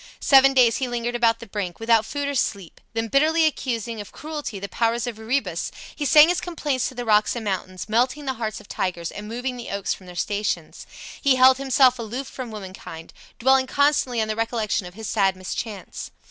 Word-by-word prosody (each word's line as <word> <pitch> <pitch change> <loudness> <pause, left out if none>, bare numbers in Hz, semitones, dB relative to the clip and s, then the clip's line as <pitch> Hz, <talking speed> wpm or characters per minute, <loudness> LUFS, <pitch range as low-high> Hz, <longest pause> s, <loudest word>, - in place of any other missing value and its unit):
Seven 270 -1 +6
days 240 -3 +5
he 260 - -1
lingered 240 0 -2
about 235 -1 +3
the - - -10
brink, 200 -4 -5
without 225 -1 +3
food 285 +2 -3
or 285 - -2
sleep; 200 - -2
then 225 0 -1
bitterly 315 +6 +3
accusing 235 -7 -2
of 205 - -11
cruelty 300 -8 -6
the 200 +1 -5
powers 230 +3 0
of 235 -3 -5
Erebus, 220 -7 -2 0.2
he 290 - -3
sang 300 +4 +7
his 360 +1 +1
complaints 295 -7 -2
to 260 - -13
the 245 0 -4
rocks 215 0 +3
and 230 -2 -5
mountains, 185 -2 -3
melting 250 +6 +1
the 265 - -1
hearts 220 -3 -4
of - - -16
tigers 170 -2 -3
and 210 0 -8
moving 245 +3 -4
the 240 - -7
oaks 200 -1 -1
from 185 - -13
their 180 - -10
stations. 205 +3 -3 0.3
He 275 -3 +4
held 260 +1 +6
himself 260 -2 +4
aloof 235 +4 -4
from 255 -2 -7
womankind, 190 -6 -9 0.2
dwelling 265 +1 +3
constantly 280 -4 +2
on 220 - +1
the 215 - -2
recollection 225 -4 -1
of 180 - -13
his 220 -1 -7
sad 195 -3 +2
mischance. 190 +2 -6
230 Hz, 205 wpm, -23 LUFS, 210-265 Hz, 0.3 s, sang